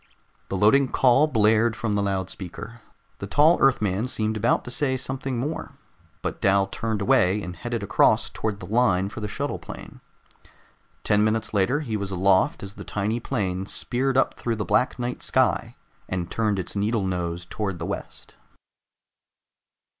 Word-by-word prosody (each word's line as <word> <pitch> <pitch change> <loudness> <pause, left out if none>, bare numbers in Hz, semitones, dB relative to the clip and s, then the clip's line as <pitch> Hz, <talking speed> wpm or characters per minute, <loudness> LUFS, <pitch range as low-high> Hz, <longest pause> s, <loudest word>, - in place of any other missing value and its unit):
The 95 - -2
loading 130 +8 +4
call 135 +4 +4
blared 110 -3 +3
from 110 -2 -2
the 100 - +1
loudspeaker. 95 +3 -4 0.4
The - - -5
tall 155 +4 +4
Earthman 110 -4 +2
seemed 110 -3 -1
about 110 +3 +1
to 125 - -5
say 130 0 0
something 130 0 -3
more, 145 +7 -4 0.5
but - - -4
Dal 95 0 +3
turned 105 +1 -3
away 95 +1 +3
and 90 0 -6
headed 115 +4 -4
across 100 - +3
toward 105 -2 -4
the 90 - -8
line 100 -3 +2
for 110 - -8
the 105 - -3
shuttle 105 - -3
plane. - - -10 1.0
Ten 105 0 +3
minutes 110 0 0
later, 105 +9 +2
he 115 -7 -3
was 100 -1 -4
aloft 95 +1 +2
as 100 0 -7
the - - -9
tiny 105 +3 -2
plane 95 -7 -2
speared 130 +4 -1
up 135 - +3
through 115 -1 -3
the 105 -2 -3
black 125 +9 +1
night 125 0 -4
sky - - +1 0.3
and 90 -2 -3
turned 105 -3 0
its 95 +1 -4
needle 105 0 0
nose 90 -2 -3
toward 95 0 -4
the 85 - -5
west. - - -7
105 Hz, 165 wpm, -24 LUFS, 95-120 Hz, 1.0 s, loading